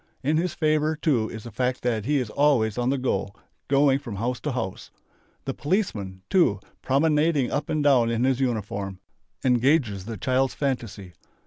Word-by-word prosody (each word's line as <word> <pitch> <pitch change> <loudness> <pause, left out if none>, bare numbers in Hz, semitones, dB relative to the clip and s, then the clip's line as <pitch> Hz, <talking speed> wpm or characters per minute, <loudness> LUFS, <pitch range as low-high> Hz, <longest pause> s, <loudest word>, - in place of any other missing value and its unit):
In 150 +4 +2
his 175 +2 -1
favour, 155 -1 +1
too, 135 -8 +1
is 110 -1 -8
the 115 - -9
fact 125 +3 -1
that 115 -4 0
he 145 +3 +2
is 125 -5 -2
always 130 -8 +2
on 125 0 0
the 140 - +1
go, 115 -7 -1 0.4
going 140 0 +3
from 120 -7 -7
house 120 +5 -2
to 150 - -3
house. 95 -7 -4 0.6
The 135 - -2
"policeman" 110 - -2
too, 185 -2 +3 0.2
promenading 150 0 +2
up 145 +1 -2
and 155 -1 0
down 130 -5 +4
in 115 +1 0
his 130 -1 +2
uniform, 100 -6 -2 0.5
engages 125 - +2
the 115 0 -6
child's 130 +5 0
fantasy. 115 -9 -3
130 Hz, 175 wpm, -25 LUFS, 110-145 Hz, 0.6 s, down